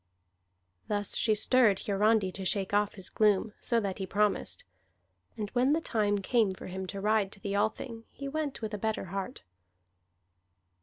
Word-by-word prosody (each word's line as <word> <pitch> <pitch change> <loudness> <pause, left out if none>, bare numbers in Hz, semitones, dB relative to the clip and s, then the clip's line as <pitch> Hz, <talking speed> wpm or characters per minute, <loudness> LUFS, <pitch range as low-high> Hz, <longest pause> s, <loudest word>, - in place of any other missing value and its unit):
Thus 205 -1 -1
she 215 -2 +3
stirred 220 -2 +4
Hiarandi 205 -1 +2
to 195 - -5
shake 190 +1 0
off 205 0 +2
his 190 -2 -7
gloom, 210 0 +2
so 235 - +3
that 200 -3 -3
he 190 - -3
promised. 210 - 0 0.7
And 210 -2 -4
when 255 +3 +3
the 320 - +2
time 210 -9 +1
came 225 -1 +3
for 190 - -7
him 190 +1 -5
to 200 +1 -5
ride 210 -1 +1
to 205 - -11
the 200 0 -4
Althing, 225 +2 -2
he 280 - -7
went 290 -3 -3
with 215 0 -3
a 210 - -3
better 220 0 -1
heart. 195 -1 -4
210 Hz, 170 wpm, -30 LUFS, 195-225 Hz, 0.7 s, stirred